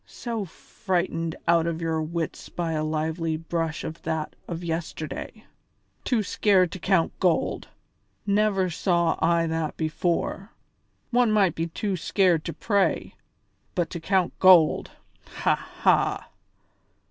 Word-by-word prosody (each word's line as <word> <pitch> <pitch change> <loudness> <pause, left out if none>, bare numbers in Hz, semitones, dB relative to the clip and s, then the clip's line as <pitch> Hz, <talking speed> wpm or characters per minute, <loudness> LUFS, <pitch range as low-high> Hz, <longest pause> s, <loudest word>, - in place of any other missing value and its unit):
So 230 -4 -4
frightened 175 -2 -3
out 170 -1 +4
of 165 -1 -2
your 160 -1 -1
wits 165 +1 -4
by 170 -2 -3
a 155 -1 -1
lively 160 +1 -1
brush 165 -1 -3
as - - -4
that 155 -1 -3
of 170 0 -5
yesterday! 165 +5 -5 0.6
Too 230 -4 +1
scared 185 -3 +3
to 185 - -6
count 185 -2 +2
gold! 180 -4 +1 0.6
Never 200 -3 +2
saw 170 -1 +1
I 170 0 +3
that 160 -1 -2
before. 170 +6 -2 0.6
One 245 -2 +3
might 200 -6 +3
be 165 +1 -2
too 195 +4 -2
scared 180 -2 +2
to - - -2
pray, 200 -3 0 0.6
but 175 -2 -1
to 170 - -4
count 185 +1 +1
gold! 180 -4 +6 0.5
Ha! - - +4
ha!" - - 0
170 Hz, 130 wpm, -25 LUFS, 160-190 Hz, 0.6 s, gold